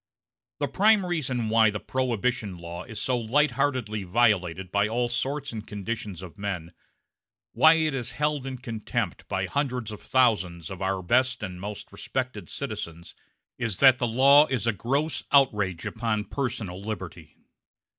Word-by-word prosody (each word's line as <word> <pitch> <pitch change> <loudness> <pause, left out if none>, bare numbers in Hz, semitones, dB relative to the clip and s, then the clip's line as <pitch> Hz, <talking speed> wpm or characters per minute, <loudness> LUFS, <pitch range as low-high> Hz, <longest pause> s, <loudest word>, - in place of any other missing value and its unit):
The - - -1
prime 210 0 +4
reason 135 -9 -1
why 110 0 +5
the 105 0 -3
Prohibition 120 -3 -1
law 85 +1 -7
is 110 -3 -7
so 130 - 0
light 135 +6 +2
heartedly 125 -5 -1
violated 95 -3 +1
by 100 +1 +2
all 120 +2 0
sorts 140 +4 -2
and 110 -2 -7
conditions 105 -3 -5
of 95 +2 -11
men, 90 -5 -4 0.8
why 160 +1 +6
it 160 -2 +1
is 125 -2 -3
held 150 -2 -1
in 130 -1 -4
contempt 115 -3 -4
by - - -1
hundreds 125 -6 -2
of 105 - -8
thousands 95 -9 +1
of 95 0 -7
our 95 -1 -1
best 130 +5 +2
and 90 -2 -6
most 105 +1 -7
respected 130 -1 -4
citizens, 100 - -6 0.5
is 115 -6 -1
that 130 0 +6
the 120 - +1
law 140 +6 +6
is 130 -3 -1
a 115 - +2
gross 140 - -1
outrage 105 - +3
upon 110 -2 -1
personal 105 -8 -4
liberty. 95 -6 -7
115 Hz, 155 wpm, -26 LUFS, 100-130 Hz, 0.8 s, why